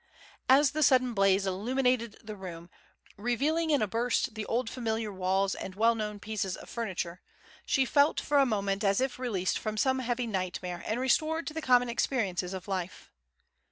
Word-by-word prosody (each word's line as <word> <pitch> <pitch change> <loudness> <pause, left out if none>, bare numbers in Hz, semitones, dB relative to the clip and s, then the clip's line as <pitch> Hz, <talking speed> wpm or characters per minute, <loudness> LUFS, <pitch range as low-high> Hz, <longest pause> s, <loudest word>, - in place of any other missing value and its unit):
As 270 +1 +6
the 310 - -2
sudden 255 -4 +4
blaze 195 -1 +3
illuminated 235 +4 0
the 215 -1 -7
room, 175 -3 -9 0.5
revealing 285 +9 0
in 285 -7 +3
a - - 0
burst 235 +2 0
the 215 -1 -5
old 240 +1 0
familiar 225 -3 -3
walls 190 +1 +1
and 190 - -7
well 225 +3 +4
known 210 -2 -4
pieces 205 -3 -3
of - - -12
furniture, 185 -6 -4 0.5
she 270 -1 +3
felt 285 +4 +3
for 290 -1 +2
a 275 - +5
moment 200 -2 -1
as 195 -1 +3
if 260 -1 -1
released 200 -8 -1
from 215 0 -4
some 260 +4 +2
heavy 245 -1 -1
nightmare 185 -4 -3
and 220 +3 -1
restored 310 +6 +1
to 305 - -5
the 320 - -4
common 245 -3 +4
experiences 205 -7 -1
of 190 0 -6
life. 185 - -4
220 Hz, 180 wpm, -29 LUFS, 195-255 Hz, 0.5 s, As